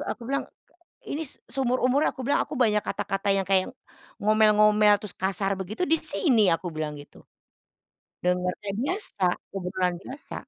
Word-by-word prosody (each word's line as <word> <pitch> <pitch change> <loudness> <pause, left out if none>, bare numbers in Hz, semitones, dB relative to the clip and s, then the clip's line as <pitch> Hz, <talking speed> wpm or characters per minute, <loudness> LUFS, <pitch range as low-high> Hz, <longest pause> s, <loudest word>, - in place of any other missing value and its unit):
Aku 235 - -12
bilang, 275 +3 -1
k - - -28 0.6
ini 315 +3 -3 0.2
seumur-umur 255 +2 +1
aku - - -12
bilang, 285 - +2
aku 290 - -7
banyak 210 -3 +3
kata-kata 195 0 -2
yang 195 -1 0
kayak 190 -1 +2 0.5
ngomel-ngomel, 210 -1 +4
terus 210 -3 -6
kasar 195 +1 0
begitu, 200 - -3
di 325 - +4
sini 215 - +3
aku 170 +2 -1
bilang 150 -2 -4
gitu. 145 - -15 1.0
Dengernya 180 +3 -1
biasa, 280 - 0 0.3
kebetulan 180 -1 -2
biasa. 265 +9 -10
210 Hz, 145 wpm, -26 LUFS, 190-250 Hz, 1.0 s, ngomel-ngomel